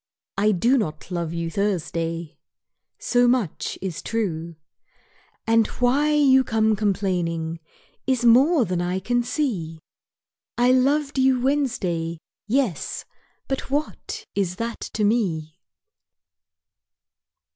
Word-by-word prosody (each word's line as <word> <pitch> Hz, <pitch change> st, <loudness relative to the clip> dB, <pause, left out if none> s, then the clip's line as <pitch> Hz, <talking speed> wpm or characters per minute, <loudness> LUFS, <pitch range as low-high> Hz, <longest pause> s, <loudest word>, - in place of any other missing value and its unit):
I 210 Hz, +2 st, +3 dB
do 235 Hz, +8 st, +3 dB
not 155 Hz, -3 st, -4 dB
love 170 Hz, -2 st, -2 dB
you 170 Hz, 0 st, -3 dB
Thursday 165 Hz, -4 st, -2 dB, 0.6 s
So 245 Hz, 0 st, +2 dB
much 240 Hz, -9 st, 0 dB
is 185 Hz, -4 st, -4 dB
true. 170 Hz, -7 st, -3 dB, 0.9 s
And 225 Hz, -1 st, +3 dB
why 275 Hz, +5 st, +2 dB
you 270 Hz, -3 st, +5 dB
come 220 Hz, -2 st, +2 dB
complaining 180 Hz, -5 st, -1 dB, 0.5 s
Is 255 Hz, -2 st, +1 dB
more 260 Hz, +4 st, +5 dB
than 180 Hz, -2 st, -1 dB
I 180 Hz, +1 st, -1 dB
can 240 Hz, +5 st, 0 dB
see. 215 Hz, -, -2 dB, 0.8 s
I 245 Hz, +1 st, +4 dB
loved 275 Hz, +2 st, +2 dB
you 260 Hz, -1 st, +4 dB
Wednesday, 230 Hz, -, -1 dB, 0.3 s
yes 235 Hz, -, -1 dB, 0.4 s
but 270 Hz, 0 st, -3 dB
what 305 Hz, +9 st, -3 dB
Is 185 Hz, -3 st, -1 dB
that 230 Hz, +3 st, -4 dB, 0.2 s
to 215 Hz, -, 0 dB
me? 180 Hz, -7 st, 0 dB
215 Hz, 110 wpm, -23 LUFS, 170-255 Hz, 0.9 s, you